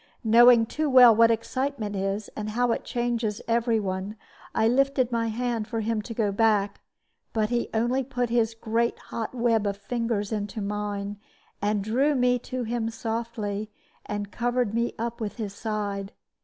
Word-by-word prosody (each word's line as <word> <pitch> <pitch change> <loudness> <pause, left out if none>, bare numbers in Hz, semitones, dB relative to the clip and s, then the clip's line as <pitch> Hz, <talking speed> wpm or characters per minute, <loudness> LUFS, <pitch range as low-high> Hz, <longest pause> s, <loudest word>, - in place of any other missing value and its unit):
Knowing 235 +1 +7
too 305 +6 -2
well 250 -4 +8
what 230 +1 +6
excitement 230 -1 -2
is, 195 +2 -2
and 215 0 -4
how 240 +2 +1
it - - -1
changes 235 -3 -1
every 230 -1 +2
one, 190 +1 -3 0.4
I 220 - +3
lifted 265 0 +2
my 230 -1 0
hand 230 -1 -2
for 225 -2 -2
him 220 0 -1
to 230 +2 -8
go 215 -3 +1
back; 205 -1 +1 0.5
but 215 0 0
he 240 -1 0
only 240 +4 +1
put 245 -2 -2
his 230 -1 +1
great 230 +1 0
hot 230 +2 -6
web 230 -3 +2
of 200 0 -2
fingers 225 0 -2
into 210 0 -3
mine, 205 0 -3 0.4
and 205 0 0
drew 265 +8 +2
me 250 -1 +3
to 255 +1 -4
him 230 0 -2
softly, 225 -2 -4 0.3
and 205 -1 -4
covered 245 -2 0
me 235 +1 0
up 235 +1 -4
with 210 -2 -3
his 210 -4 -5
side. 205 -2 -3
225 Hz, 170 wpm, -26 LUFS, 210-240 Hz, 0.5 s, well